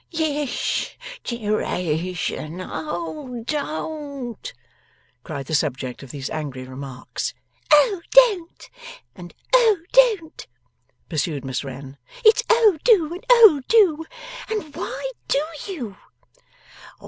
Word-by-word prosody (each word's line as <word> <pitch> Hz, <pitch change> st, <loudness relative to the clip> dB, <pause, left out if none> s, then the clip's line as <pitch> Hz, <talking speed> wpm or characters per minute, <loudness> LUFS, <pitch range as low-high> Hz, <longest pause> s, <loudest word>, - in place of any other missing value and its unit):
'Yes. 300 Hz, -5 st, -1 dB, 0.3 s
Deration, 180 Hz, -7 st, -2 dB
oh 175 Hz, -, -5 dB
don't!' 290 Hz, -4 st, -4 dB, 0.7 s
cried 135 Hz, -, -6 dB
the 155 Hz, -, -6 dB
subject 130 Hz, -4 st, -1 dB
of 135 Hz, -, -11 dB
these 135 Hz, 0 st, -5 dB
angry 140 Hz, -5 st, -5 dB
remarks. 130 Hz, -1 st, -6 dB, 0.3 s
'Oh 345 Hz, +5 st, +5 dB
don't 425 Hz, -9 st, +4 dB, 0.5 s
and 175 Hz, -2 st, -11 dB, 0.2 s
oh 465 Hz, -5 st, +6 dB, 0.2 s
don't,' 435 Hz, -11 st, +3 dB, 0.6 s
pursued 150 Hz, -3 st, -2 dB
Miss 130 Hz, +1 st, -3 dB
Wren. 135 Hz, +1 st, -9 dB, 0.3 s
'It's 435 Hz, 0 st, +7 dB
oh 440 Hz, -8 st, +5 dB
do 345 Hz, -10 st, +4 dB
and 360 Hz, -, -8 dB
oh 440 Hz, -, +8 dB
do. 355 Hz, -9 st, +4 dB, 0.4 s
And 405 Hz, -10 st, -4 dB
why -, -, -4 dB, 0.2 s
do 275 Hz, -, +2 dB, 0.3 s
you? 250 Hz, -, -6 dB
275 Hz, 100 wpm, -22 LUFS, -, 0.7 s, oh